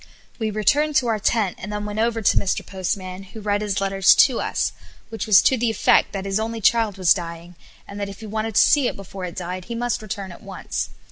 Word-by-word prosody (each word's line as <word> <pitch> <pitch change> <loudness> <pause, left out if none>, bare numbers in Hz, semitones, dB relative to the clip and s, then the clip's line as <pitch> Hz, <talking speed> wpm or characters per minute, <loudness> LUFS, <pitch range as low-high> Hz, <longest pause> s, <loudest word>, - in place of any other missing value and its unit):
We 220 -1 -1
returned 285 +9 +1
to 260 -4 +3
our 220 -1 0
tent 205 -2 0
and 210 - -7
then 210 0 -4
went 210 +1 -4
over 225 0 0
to - - +3
Mr. 195 - 0
Postman, 185 0 -4
who 195 +3 -11
read 205 -1 -1
his 205 -2 -1
letter 195 0 -3
to 230 +5 +6
us, - - -1 0.4
which 225 0 -5
was 210 -3 +7
to 260 - +3
the 235 0 +1
effect 220 - +3
that 195 -1 -5
his 195 +1 0
only 225 +1 -3
child 220 -2 +2
was 185 -3 +5
dying, 170 -1 -7 0.3
and 200 - -8
that 200 -1 -3
if 200 +2 -11
he - - -7
wanted 220 0 -3
to - - +7
see 285 -4 +4
it - - -3
before 195 -1 -8
it 175 - -7
died 180 0 -5
he 235 - -6
must 240 0 -1
return 195 -2 -6
at 175 - -13
once. - - -5
205 Hz, 245 wpm, -22 LUFS, 190-225 Hz, 0.4 s, was